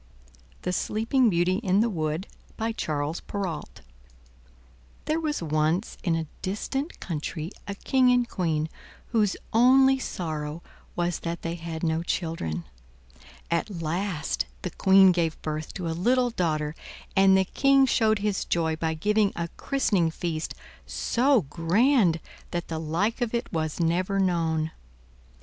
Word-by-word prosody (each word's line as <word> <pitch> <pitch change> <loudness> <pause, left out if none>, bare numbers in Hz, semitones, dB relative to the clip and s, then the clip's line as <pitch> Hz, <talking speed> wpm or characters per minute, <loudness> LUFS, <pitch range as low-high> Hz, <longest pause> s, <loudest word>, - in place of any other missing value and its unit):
THE 180 - -1
SLEEPING 225 +6 +2
BEAUTY 180 0 +2
IN 200 -2 +2
THE 235 - +3
WOOD 155 0 -2 0.3
By 225 +1 -1
Charles 155 -6 -2
Perrault 185 - -5 1.2
There 310 +2 +1
was 300 - -2
once 155 +5 0
in 170 -5 +2
a 165 0 -2 0.2
distant 270 - -3
country 160 0 -4 0.2
a 200 - -4
King 255 +4 +3
and 245 -1 +3
Queen 160 -7 -1 0.4
whose 215 -4 +2 0.2
only 265 +3 +6
sorrow 155 -7 -4 0.3
was 175 -1 -1
that 170 0 -4
they 165 - -2
had 165 -1 -6
no 160 0 +1
children. 160 - -2 0.9
At 170 +2 -1
last 170 0 -1 0.2
the 180 - -3
Queen 190 +1 +6
gave 170 -3 0
birth 155 0 -3
to 180 -3 -3
a - - -1
little 245 +8 +2
daughter 155 -7 -1 0.4
and 195 0 +6
the 190 - +3
King 275 +6 +4
showed 220 -4 +3
his 205 -1 -1
joy 160 -2 0
by 160 0 -1
giving 210 +4 +2
a 170 0 -3
christening 205 - +1
feast 160 -1 -3 0.3
so 255 -1 +2
grand 175 - +3 0.3
that 175 0 -4
the 160 -1 -3
like 175 +10 -1
of 240 -1 0
it 235 - -3
was 155 -1 -2
never 180 +4 +1
known. 165 -4 +1
175 Hz, 140 wpm, -26 LUFS, 160-220 Hz, 1.2 s, only